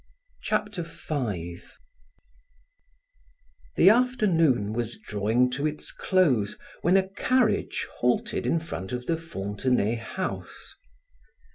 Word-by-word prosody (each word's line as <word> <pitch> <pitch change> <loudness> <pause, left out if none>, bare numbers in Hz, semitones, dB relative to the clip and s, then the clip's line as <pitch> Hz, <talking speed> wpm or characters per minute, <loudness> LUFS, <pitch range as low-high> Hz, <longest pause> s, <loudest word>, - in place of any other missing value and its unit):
Chapter 210 -4 -1
5 105 - -5 2.0
The - - +7
afternoon 170 - +2
was 120 0 -3
drawing 110 +5 +1
to 140 +4 0
its 150 0 -5
close 135 - +2 0.2
when 180 +3 +4
a 190 0 +2
carriage 215 +2 +1
halted 125 0 0
in 165 - +2
front 95 - -6
of 125 0 -4
the 165 - +1
Fontenay 115 -5 -1
house. 180 +11 -6
135 Hz, 100 wpm, -26 LUFS, 110-185 Hz, 2.0 s, The